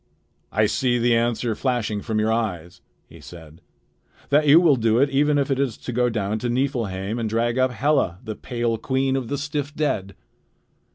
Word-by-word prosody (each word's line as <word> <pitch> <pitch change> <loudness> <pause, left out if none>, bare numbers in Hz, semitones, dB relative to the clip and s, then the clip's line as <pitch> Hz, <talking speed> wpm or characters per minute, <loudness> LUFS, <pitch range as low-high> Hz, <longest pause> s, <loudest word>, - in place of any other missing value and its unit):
"I 110 +1 +2
see 120 +3 +1
the 120 0 +2
answer 115 0 0
flashing 110 -4 -2
from 110 -1 -2
your 110 +1 +1
eyes," 90 -6 -3 0.2
he - - -16
said, 80 -2 -13 0.7
"that 150 +1 +3
you 150 +4 +8
will 165 -5 +4
do 115 -2 +1
it 140 +2 +3
even 145 +2 +2
if 140 0 0
it 135 - 0
is 135 -5 -1
to 125 - -7
go 125 +1 +2
down 110 -1 -2
to 120 - -3
Niflheim 120 -5 -2
and 115 -2 -2
drag 115 +3 0
up 130 0 +3
Hela, 125 - 0
the 110 -3 -5
pale 120 -2 -2
queen 130 +2 0
of 130 -3 -2
the 145 - -2
stiff 145 0 -4
dead." 100 - -2
120 Hz, 190 wpm, -23 LUFS, 110-135 Hz, 0.7 s, you